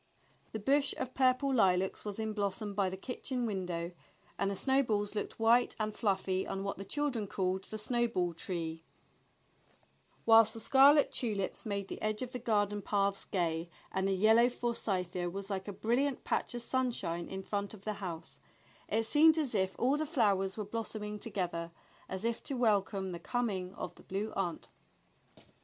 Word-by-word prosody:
The 220 - -4
bush 275 +5 +2
of 255 - -4
purple 265 +1 +3
lilacs 190 -5 +2
was 205 -2 -5
in 220 -1 -2
blossom 205 0 -2
by 195 -1 +1
the 190 - -6
kitchen 250 +3 -3
window, 180 -5 -3 0.4
and 195 - 0
the 200 - -2
snowballs 220 -5 +1
looked 210 - -4
white 235 +2 +4
and 215 0 -1
fluffy 190 -3 0
on 195 0 -3
what 200 0 -3
the 195 - -6
children 260 -4 -1
called 190 0 -1
the 215 - -6
snowball 220 -6 0
tree, 165 -1 -4 1.4
while 225 0 +9
the 220 +1 -5
scarlet 275 +5 +6
tulips 210 -4 -2
made 200 -1 -2
the - - -7
edge 215 +2 -1
of 250 - -6
the 250 - -4
garden 205 -3 +1
paths 200 0 0
gay, 170 -2 -1 0.2
and 190 0 0
the 195 - +2
yellow 220 +5 +5
forsythia 185 -8 -2
was 195 +3 -6
like 190 0 -3
a - - -3
brilliant 245 +7 0
patch - - -1
of 240 - -2
sunshine 240 -11 -1
in 190 0 -5
front 200 0 -2
of 195 - -16
the 215 - -1
house; 170 -4 -6 0.5
it 225 +1 +1
seemed 315 +6 +6
as 290 -6 0
if 190 -2 +1
all 265 +4 +2
the 310 0 -2
flowers 200 - +1
were 210 - -3
blossoming 210 -1 -4
together, 180 -6 -3 0.4
as 190 +3 -4
if 235 0 0
to 275 - -3
welcome 200 -4 +1
the 170 - -5
coming 195 -3 -2
of - - -5
the - - -17
Blue 200 +3 -3
Aunt. 180 -4 -2
205 Hz, 175 wpm, -33 LUFS, 190-235 Hz, 1.4 s, while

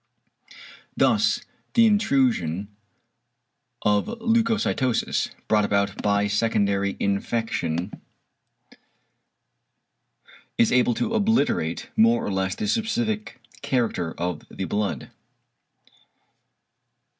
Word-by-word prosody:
Thus - - +3 0.3
the 230 -2 +6
intrusion 125 - +1 1.1
of 105 -1 +2
a 230 - -4
leucocytosis, 225 - 0 0.2
brought 105 -1 +3
about 100 -1 0
by 100 0 +2
secondary 100 -2 0
infection, 100 -4 -1 2.7
is 115 - +3
able 125 -1 +3
to 225 - -2
obliterate 215 - 0
more 115 +1 +4
or - - -2
less 95 0 -1
the 215 - -3
specific 220 - -1 0.2
character 115 -10 -1
of 90 -2 -3
the - - -5
blood. 105 0 -3
115 Hz, 85 wpm, -24 LUFS, -, 2.7 s, the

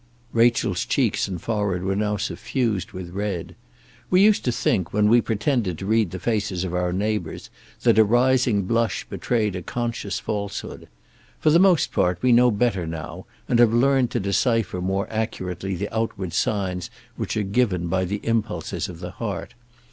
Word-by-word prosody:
Rachel's 115 -5 +2
cheeks - - +1
and 90 -3 -5
forehead 100 -3 -1
were 95 +1 0
now 105 0 0
suffused 105 -2 -2
with 90 -2 -7
red. 100 -3 -4 0.5
We 180 - +4
used 210 0 +4
to 125 - +2
think, 95 -6 0
when 105 0 +3
we 120 +2 +5
pretended 110 - -1
to 95 - -6
read 110 -1 +2
the 95 - -6
faces 100 -3 -1
of 90 -2 -4
our 90 0 0
neighbours, 100 -2 -3 0.3
that 110 - +4
a - - +9
rising 120 -1 +3
blush 115 +2 0
betrayed 110 -5 -1
a 90 - -4
conscious 115 -2 -3
falsehood. 100 -2 -5 0.5
For 155 - +3
the 165 - +6
most 185 -4 +4
part 90 -1 +1
we 125 - +4
know 125 +1 +6
better 100 -6 0
now, 80 -1 -7 0.2
and 120 - +2
have 115 -2 +5
learned 130 0 +3
to - - -1
decipher 100 -1 0
more 95 +2 -1
accurately 95 -4 -3
the 100 +4 -5
outward 105 -6 -2
signs 95 -3 -1 0.3
which - - -3
are 105 - +1
given 100 -4 0
by 95 +2 0
the 100 +3 -3
impulses 110 -7 -2
of 85 -1 -10
the 90 -1 -6
heart. 105 0 -5
105 Hz, 175 wpm, -23 LUFS, 95-115 Hz, 0.5 s, a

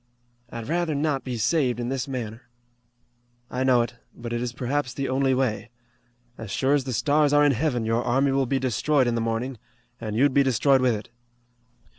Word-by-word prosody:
"I'd 115 -2 -7
rather 165 0 0
not 145 -2 0
be 125 -2 -4
saved 125 +1 +1
in 120 0 -2
this 135 -1 -2
manner." 120 -2 -6 1.0
"I 130 - -1
know 125 -2 +4
it, 120 +1 -8 0.2
but 120 0 -6
it 120 - -1
is 125 -1 -2
perhaps 125 +1 -2
the 135 -1 -2
only 130 0 +1
way. 125 -4 -1 0.7
As 110 - -7
sure 135 +7 +1
as 140 -3 +1
the 130 - -3
stars 145 +3 +2
are 145 0 +5
in 145 - +5
Heaven 125 -3 0
your 115 +2 0
army 135 +3 +2
will 135 -1 +1
be 135 - +1
destroyed 130 +2 +1
in 120 - 0
the 115 - -1
morning, 115 +2 -2 0.4
an' 110 -2 -4
you'd 135 +3 +3
be 140 - +5
destroyed 135 +1 +3
with 125 -3 +2
it. 105 - -8
130 Hz, 200 wpm, -25 LUFS, 120-140 Hz, 1.0 s, are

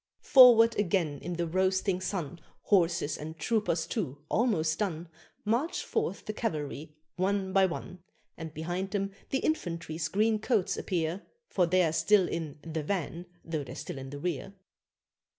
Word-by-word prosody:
'" - - -64
Forward 235 -3 +9
again 170 -7 0
in 175 - -5
the 170 0 -1
roasting 185 +2 +1
sun, 175 -4 -3 0.2
Horses 170 -5 +2
and 160 +2 -7
troopers, 175 -1 0
too, 160 - -3
almost 165 -10 +1
done, 175 -5 -2 0.4
March 240 +11 0
forth - - -2
the 215 - -3
cavalry, 150 - -4 0.2
one 190 0 0
by 190 0 +5
one; 180 +1 -6 0.4
And 160 -1 -7
behind 175 +5 -3
them 195 -1 -2 0.2
the 270 - +1
infantry's 170 - -2
green 215 +4 +2
coats 215 -4 +1
appear, 170 +1 -2 0.3
For 180 -3 +2
they're 175 -2 +3
still 180 +3 +4
in 160 -4 -4
"the 160 -1 -3
van" 175 +1 -3 0.2
though 160 -3 -2
they're 135 - -9
still 135 - -6
in 135 0 -7
the 145 - -7
rear. 180 +5 -4
180 Hz, 155 wpm, -30 LUFS, 160-200 Hz, 0.4 s, Forward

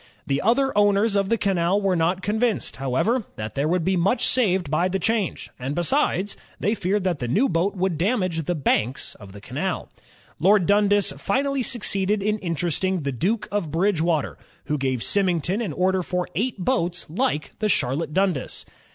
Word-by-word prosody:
The 140 -3 0
other 245 +6 +2
owners 205 +1 +3
of 195 -1 +1
the 230 - +2
canal 190 -1 +1
were 195 -2 +1
not 175 +3 0
convinced, 220 +2 -1
however, 135 - 0
that 110 0 -5
there 140 +2 0
would 170 0 0
be 190 - +2
much 190 +8 +2
saved 190 - +1
by 170 +4 +2
the 190 +1 -1
change, 215 -1 -1
and 135 +3 -3
besides, 195 - +1 0.2
they 210 - +1
feared 200 -1 0
that 180 -5 0
the 120 - -3
new 210 - +2
boat 190 0 0
would 185 -4 -1
damage 185 - 0
the 175 - -1
banks 130 -4 0
of 100 -2 -13
the 100 - -11
canal. - - -4 0.5
Lord 195 +1 +4
Dundas 205 -1 +3
finally 275 - 0
succeeded 205 -4 0
in 215 +1 0
interesting 175 +1 -1
the 140 - -1
Duke 195 - -1
of 200 -6 -1
Bridgewater, 165 -2 0 0.3
who 150 -1 -1
gave 130 -3 -1
Symington 185 +1 +1
an 205 -8 -2
order 185 +4 +1
for 180 0 -2
eight 240 +4 -1
boats 180 -4 -1
like 170 - -1
the 215 -1 0
Charlotte 145 -1 0
Dundas. 185 -5 -1
185 Hz, 175 wpm, -23 LUFS, 165-205 Hz, 0.5 s, Lord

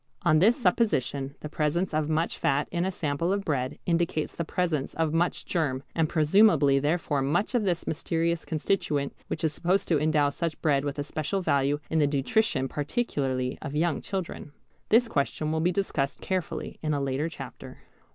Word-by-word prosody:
On 155 -3 +4
this 220 +8 +5
supposition 145 - +1
the - - -5
presence 155 +4 -1
of 155 0 0
much 160 +2 0
fat 140 +2 +1
in 175 0 0
a 190 - 0
sample 165 0 -1
of 200 0 -1
bread 130 -4 -1
indicates 165 -2 0
the 170 - -2
presence 160 -4 -1
of 160 -1 0
much 170 +2 0
germ, 140 -6 -1
and 160 -2 +1
presumably 155 -4 +4
therefore 150 -1 0
much 165 - 0
of 235 -4 +1
this 175 -3 0
mysterious 165 +1 -1
constituent 150 -3 -1
which 160 - -4
is 155 -1 +1
supposed 180 +5 0
to 155 -4 +3
endow 150 -2 +3
such 165 +1 -3
bread 140 -3 +2
with 145 0 -3
a 145 - -1
special 155 +6 -2
value 140 -2 +2
in 160 - +2
the 145 - +4
nutrition 140 +1 +1
particularly 135 - -2
of 145 -1 -5
young 165 0 +1
children. 185 -6 -5 0.4
This 235 +2 +5
question 150 -3 -1
will 160 0 0
be 175 +2 +2
discussed 160 -7 -1
carefully 185 -3 -3
in 155 -1 0
a - - 0
later 140 +3 -1
chapter. 135 -5 -10
155 Hz, 180 wpm, -27 LUFS, 145-175 Hz, 0.4 s, this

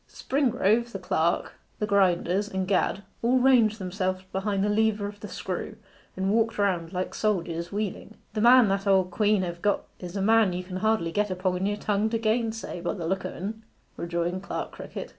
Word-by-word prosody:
Springrove, 240 -4 +1
the - - -2
clerk, 170 -2 -1 0.2
the 210 - -1
grinders, 195 0 +2
and 190 -2 -2
Gad, 195 0 +1 0.2
all 245 +3 +3
ranged 245 -4 +4
themselves 185 -1 -2
behind 195 0 -1
the - - +2
lever 215 -1 +2
of 205 0 -7
the - - -7
screw, - - -5 0.4
and 190 +1 0
walked 225 +1 +1
round 180 -5 0
like 185 0 -3
soldiers 175 -5 -1
wheeling. 210 +1 -4 0.2
'The 215 - -1
man 245 0 +7
that 195 +1 0
the - - +1
old 190 -2 +3
quean 210 0 +2
hev 175 -1 -5
got 205 -1 +1 0.2
is 180 +1 -8
a - - -1
man 220 -3 +4
you 180 +1 -3
can 185 0 -6
hardly 215 -4 +1
get 210 +4 0
upon 185 0 -1
your 205 0 -1
tongue 210 +1 0
to 230 - 0
gainsay, 225 -4 -1
by 175 - -2
the 175 -4 -5
look 190 +2 -1
o' - - -6
en,' 215 +5 -6 0.3
rejoined 170 +2 -2
Clerk 200 - -4
Crickett. - - -7
200 Hz, 200 wpm, -27 LUFS, 185-220 Hz, 0.4 s, man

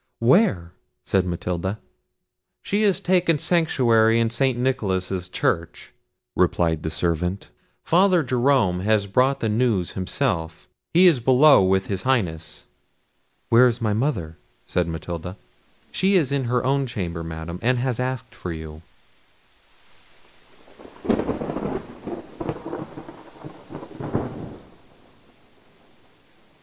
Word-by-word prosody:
"Where?" 115 - +3 0.3
said 95 -2 +1
Matilda. 90 +3 -3 0.9
"She 205 +2 0
has 200 -3 +2
taken 180 -3 +2
sanctuary 120 -10 +3
in 115 -1 +1
St. 130 +1 +1
Nicholas's 95 -8 -1
church," 85 -2 -2 0.4
replied 80 -3 +1
the 80 - -3
servant; 85 +4 -2 0.3
"Father 180 0 +3
Jerome 125 -8 +2
has 105 +1 +1
brought 125 +7 +1
the 115 - 0
news 110 -5 +1
himself; 85 -3 -2 0.2
he 180 +3 +5
is 165 -8 +5
below 130 +2 +6
with 95 0 +2
his 95 -2 -3
Highness." 90 -12 -1 0.8
"Where 120 +2 +6
is 120 -1 -1
my 110 -3 0
mother?" 105 - -2 0.3
said 90 -2 -1
Matilda. 85 +3 -6 0.5
"She 195 +1 +2
is 155 -8 +2
in 140 -2 0
her 125 +1 0
own 135 0 +1
chamber, 85 -7 -4
Madam, 80 +1 -6
and 125 +2 +2
has 125 -1 -1
asked 130 -1 -3
for 90 - -6
you." 80 -1 -8
110 Hz, 100 wpm, -23 LUFS, 90-130 Hz, 0.9 s, below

